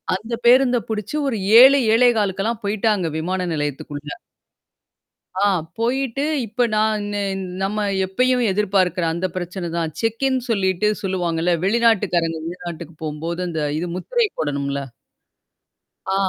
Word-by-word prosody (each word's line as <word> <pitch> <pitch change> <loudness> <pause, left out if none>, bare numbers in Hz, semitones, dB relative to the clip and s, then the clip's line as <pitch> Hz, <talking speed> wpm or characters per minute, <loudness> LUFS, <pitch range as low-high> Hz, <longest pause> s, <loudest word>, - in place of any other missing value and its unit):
அந்த 220 +5 -6
பேருந்த 250 +1 +5
புடிச்சு 215 +4 -3
ஒரு 245 -5 -1 0.2
7 270 +2 +8 0.2
7:15க்கெல்லாம் 225 -2 +2
போய்ட்டாங்க 205 -3 0
விமான 180 +3 -2
நிலையத்துக்குள்ள. 145 0 -4 1.3
ஆ. - - +2 0.4
போயிட்டு 260 +3 -1 0.2
இப்ப 235 +3 -1
நான் 215 -1 +1
நே 205 - -1 0.4
நம்ம 210 +2 -1 0.2
எப்பயும் 250 +6 +1
எதிர்பார்க்கறேன். 185 -4 +1
அந்த 175 +3 -1
பிரச்சனை 180 0 -4
தான். 165 -2 -2
செக்ன்னு 255 +4 0
சொல்லிட்டு 195 -2 +1
சொல்லுவாங்கல்ல. 175 -2 0
வெளிநாட்டுக்காரங்க 195 -7 +2
வெளிநாட்டுக்கு 170 -2 -7
போம்போது 160 +3 -4
அந்த 160 -2 -3 0.2
இது 175 - -3
முத்திரை 475 - 0
போடணும்ல. 140 -2 -2 1.3
ஆ - - +1
195 Hz, 115 wpm, -21 LUFS, 170-225 Hz, 1.3 s, 7